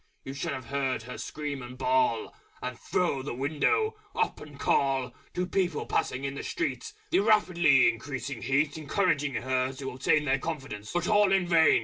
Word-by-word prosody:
You 135 Hz, -, -6 dB
should 140 Hz, -, -3 dB
have 130 Hz, -3 st, -6 dB
heard 135 Hz, -2 st, -1 dB
her 125 Hz, +2 st, -8 dB
Scream 145 Hz, -3 st, -4 dB
and 125 Hz, +1 st, -9 dB
Bawl, 130 Hz, -3 st, +1 dB, 0.3 s
And 125 Hz, 0 st, -4 dB
throw 170 Hz, -7 st, 0 dB
the 130 Hz, -2 st, -5 dB
window 160 Hz, -, +1 dB, 0.2 s
up 445 Hz, -1 st, 0 dB
and 145 Hz, -2 st, -11 dB
call 135 Hz, -3 st, +1 dB, 0.2 s
To 180 Hz, -, 0 dB
People 180 Hz, -3 st, 0 dB
passing 130 Hz, +1 st, -1 dB
in 140 Hz, 0 st, -2 dB
the 140 Hz, -, -5 dB
Street 395 Hz, +5 st, -3 dB, 0.2 s
(The 360 Hz, -, +4 dB
rapidly 175 Hz, -, +5 dB
increasing 125 Hz, +3 st, -3 dB
Heat 145 Hz, +3 st, +1 dB
Encouraging 150 Hz, -3 st, 0 dB
her 130 Hz, +1 st, 0 dB
to 135 Hz, 0 st, -5 dB
obtain 145 Hz, +4 st, +2 dB
Their 135 Hz, 0 st, +2 dB
confidence) 135 Hz, -10 st, -5 dB
but 175 Hz, 0 st, 0 dB
all 205 Hz, -2 st, +4 dB
in 190 Hz, -2 st, +3 dB
vain! 165 Hz, -2 st, +5 dB
140 Hz, 175 wpm, -28 LUFS, 130-175 Hz, 0.3 s, rapidly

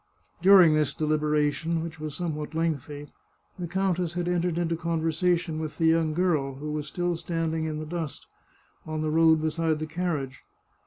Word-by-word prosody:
During 185 Hz, -3 st, +7 dB
this 150 Hz, -3 st, +1 dB
deliberation, 155 Hz, +1 st, 0 dB
which 165 Hz, -1 st, -7 dB
was 155 Hz, -1 st, -5 dB
somewhat 155 Hz, -3 st, -4 dB
lengthy, 150 Hz, -3 st, -2 dB, 0.5 s
the 175 Hz, -, -3 dB
countess 180 Hz, -1 st, 0 dB
had 175 Hz, 0 st, -2 dB
entered 175 Hz, -1 st, 0 dB
into 170 Hz, -1 st, 0 dB
conversation 165 Hz, 0 st, 0 dB
with 155 Hz, -1 st, -5 dB
the 165 Hz, -, +1 dB
young 160 Hz, -1 st, +3 dB
girl, 155 Hz, -7 st, +1 dB
who 150 Hz, +3 st, -5 dB
was 150 Hz, -1 st, -3 dB
still 175 Hz, -1 st, -1 dB
standing 165 Hz, -1 st, -2 dB
in 155 Hz, -1 st, -3 dB
the 155 Hz, -, -5 dB
dust, 160 Hz, -2 st, -5 dB, 0.6 s
on 155 Hz, 0 st, -3 dB
the 155 Hz, -, -1 dB
road 160 Hz, 0 st, +4 dB
beside 160 Hz, 0 st, 0 dB
the 155 Hz, -, -2 dB
carriage. 155 Hz, -6 st, -3 dB
160 Hz, 165 wpm, -27 LUFS, 155-170 Hz, 0.6 s, During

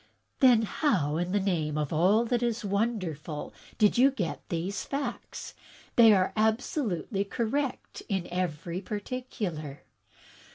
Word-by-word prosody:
"Then 245 Hz, -5 st, +6 dB
how 185 Hz, -, +1 dB
in 175 Hz, +1 st, -1 dB
the 205 Hz, -, +2 dB
name 160 Hz, -6 st, 0 dB
of 150 Hz, -1 st, -1 dB
all 195 Hz, +9 st, +4 dB
that 240 Hz, 0 st, 0 dB
is 235 Hz, -2 st, -1 dB
wonderful 190 Hz, -8 st, -2 dB, 0.2 s
did 210 Hz, +2 st, +4 dB
you 265 Hz, +2 st, +7 dB
get 205 Hz, -12 st, -3 dB
these 180 Hz, +4 st, -2 dB
facts? 280 Hz, +1 st, -5 dB, 0.4 s
They 230 Hz, -2 st, +8 dB
are 190 Hz, -2 st, +3 dB
absolutely 220 Hz, -, 0 dB
correct 245 Hz, +6 st, -2 dB
in 190 Hz, -4 st, -1 dB
every 175 Hz, 0 st, -2 dB
particular." 200 Hz, -, -5 dB
200 Hz, 125 wpm, -29 LUFS, 170-235 Hz, 0.4 s, They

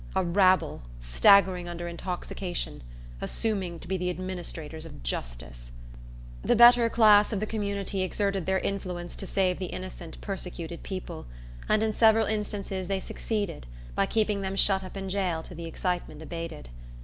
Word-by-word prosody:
A 190 Hz, -, +3 dB
rabble, 185 Hz, -, +3 dB, 0.2 s
staggering 175 Hz, -, +4 dB
under 175 Hz, 0 st, -5 dB
intoxication, 175 Hz, -, -4 dB, 0.4 s
assuming 195 Hz, -6 st, -1 dB
to -, -, -11 dB
be 190 Hz, +2 st, 0 dB
the 180 Hz, 0 st, -1 dB
administrators 175 Hz, -4 st, -5 dB
of 160 Hz, -, -10 dB
justice! -, -, -5 dB, 0.7 s
The -, -, +3 dB
better 240 Hz, 0 st, +8 dB
class 210 Hz, -3 st, +6 dB
of 210 Hz, -, -1 dB
the 215 Hz, -, -1 dB
community 200 Hz, -2 st, -2 dB
exerted 195 Hz, -1 st, -1 dB
their 190 Hz, 0 st, +3 dB
influence 180 Hz, -3 st, -3 dB
to 195 Hz, -, -4 dB
save 185 Hz, -2 st, +1 dB
the 185 Hz, -, -3 dB
innocent, 180 Hz, -3 st, -7 dB
persecuted 175 Hz, -4 st, -5 dB
people; 185 Hz, -, -6 dB, 0.4 s
and 215 Hz, 0 st, +4 dB
in 220 Hz, -1 st, +1 dB
several 220 Hz, 0 st, +5 dB
instances 200 Hz, -3 st, -3 dB
they 195 Hz, 0 st, 0 dB
succeeded, 205 Hz, -, -3 dB, 0.3 s
by -, -, +1 dB
keeping 210 Hz, -2 st, +1 dB
them 190 Hz, 0 st, -2 dB
shut 195 Hz, -1 st, +3 dB
up 185 Hz, +1 st, -8 dB
in 195 Hz, 0 st, -4 dB
jail 185 Hz, -4 st, -1 dB
till 175 Hz, -, -10 dB
the 170 Hz, -, -5 dB
excitement 175 Hz, -2 st, -3 dB
abated. 165 Hz, -, -6 dB
185 Hz, 155 wpm, -28 LUFS, 170-200 Hz, 0.7 s, better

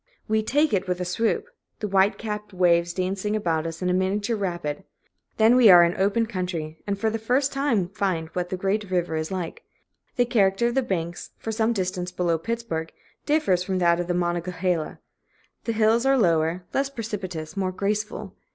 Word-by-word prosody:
We 220 Hz, 0 st, +2 dB
"take" 290 Hz, +5 st, +1 dB
it 190 Hz, -2 st, +1 dB
with 180 Hz, 0 st, -1 dB
a 180 Hz, -, -2 dB
swoop, 225 Hz, -, 0 dB, 0.3 s
the 210 Hz, -, -2 dB
white 195 Hz, +1 st, +3 dB
capped 210 Hz, -2 st, -5 dB
waves 175 Hz, -1 st, +3 dB
dancing 190 Hz, +3 st, -2 dB
about 165 Hz, -6 st, 0 dB
us 165 Hz, +2 st, -6 dB
in -, -, 0 dB
a 180 Hz, -, +2 dB
miniature 200 Hz, +5 st, 0 dB
rapid. 175 Hz, -7 st, -3 dB, 0.5 s
Then 225 Hz, +2 st, +5 dB
we 245 Hz, -4 st, +7 dB
are 175 Hz, -2 st, +9 dB
in 170 Hz, -, +3 dB
the -, -, -9 dB
open 205 Hz, +4 st, +2 dB
country, 180 Hz, -7 st, -4 dB
and 200 Hz, -1 st, -1 dB
for 220 Hz, +2 st, 0 dB
the 225 Hz, -, -2 dB
first 255 Hz, +5 st, +1 dB
time 265 Hz, -10 st, +1 dB
find 190 Hz, -5 st, -1 dB
what 180 Hz, +1 st, -3 dB
the 185 Hz, -, -3 dB
great 195 Hz, +2 st, -1 dB
river 175 Hz, -3 st, 0 dB
is 155 Hz, 0 st, -2 dB
like. 180 Hz, -3 st, -4 dB, 0.5 s
The 245 Hz, -, +3 dB
character 200 Hz, -2 st, +2 dB
of -, -, -4 dB
the 265 Hz, -, +2 dB
banks, 175 Hz, -7 st, -3 dB
for 225 Hz, -, -4 dB
some 220 Hz, +1 st, +1 dB
distance 185 Hz, -3 st, -2 dB
below 175 Hz, -2 st, 0 dB
Pittsburg, 225 Hz, -6 st, -3 dB, 0.4 s
differs 295 Hz, -, +2 dB
from 185 Hz, +1 st, -1 dB
that 170 Hz, -1 st, +3 dB
of 175 Hz, -, -2 dB
the 175 Hz, -, 0 dB
Monongahela. 175 Hz, -1 st, -1 dB, 0.7 s
The 230 Hz, -, 0 dB
hills 225 Hz, +2 st, +3 dB
are 270 Hz, 0 st, +4 dB
lower, 170 Hz, -3 st, +2 dB
less 275 Hz, 0 st, +1 dB
precipitous, 190 Hz, -, -5 dB
more 190 Hz, -2 st, -1 dB
graceful. 210 Hz, +1 st, -3 dB
190 Hz, 195 wpm, -25 LUFS, 175-220 Hz, 0.7 s, are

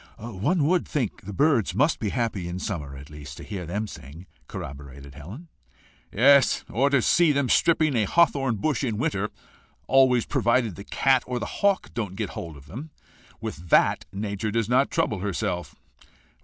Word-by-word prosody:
"One 120 Hz, -, -1 dB
WOULD 175 Hz, +3 st, +2 dB
think 125 Hz, -8 st, -2 dB
the -, -, -4 dB
birds 140 Hz, -1 st, +2 dB
must 150 Hz, +4 st, +2 dB
be 105 Hz, -, -1 dB
happy 110 Hz, -6 st, -2 dB
in 85 Hz, +1 st, -4 dB
summer, 75 Hz, -8 st, -5 dB
at 70 Hz, +2 st, -12 dB
least, 75 Hz, -1 st, -10 dB
to -, -, -9 dB
hear 95 Hz, -5 st, -6 dB
them 105 Hz, +5 st, -2 dB
sing," 80 Hz, -1 st, -11 dB, 0.2 s
corroborated 70 Hz, -1 st, -9 dB
Helen. 95 Hz, -, -10 dB, 0.6 s
"Yes, 135 Hz, +5 st, +4 dB
or 135 Hz, +5 st, +2 dB
to 140 Hz, -4 st, +2 dB
see 170 Hz, -3 st, +4 dB
them 140 Hz, -3 st, 0 dB
stripping 155 Hz, -4 st, +3 dB
a 110 Hz, -3 st, +2 dB
hawthorn 135 Hz, -, +2 dB
bush 145 Hz, +8 st, -1 dB
in 115 Hz, -5 st, -1 dB
winter 105 Hz, -7 st, -1 dB, 0.6 s
always 130 Hz, -3 st, +4 dB
provided 115 Hz, -4 st, +1 dB
the 100 Hz, -, -9 dB
cat 135 Hz, -2 st, +2 dB
or 125 Hz, 0 st, -2 dB
the 115 Hz, -, -3 dB, 0.2 s
hawk 200 Hz, -1 st, +1 dB
don't 105 Hz, -5 st, -4 dB
get 105 Hz, -2 st, -3 dB
hold 80 Hz, -3 st, -7 dB
of 70 Hz, -, -15 dB
them. 135 Hz, -, -8 dB, 0.5 s
With 85 Hz, +3 st, -7 dB
that -, -, +3 dB
nature 100 Hz, +1 st, -3 dB
does 115 Hz, 0 st, 0 dB
not 130 Hz, +3 st, +3 dB
trouble 105 Hz, -, 0 dB
herself. 90 Hz, -4 st, -3 dB
110 Hz, 175 wpm, -25 LUFS, 90-135 Hz, 0.6 s, Yes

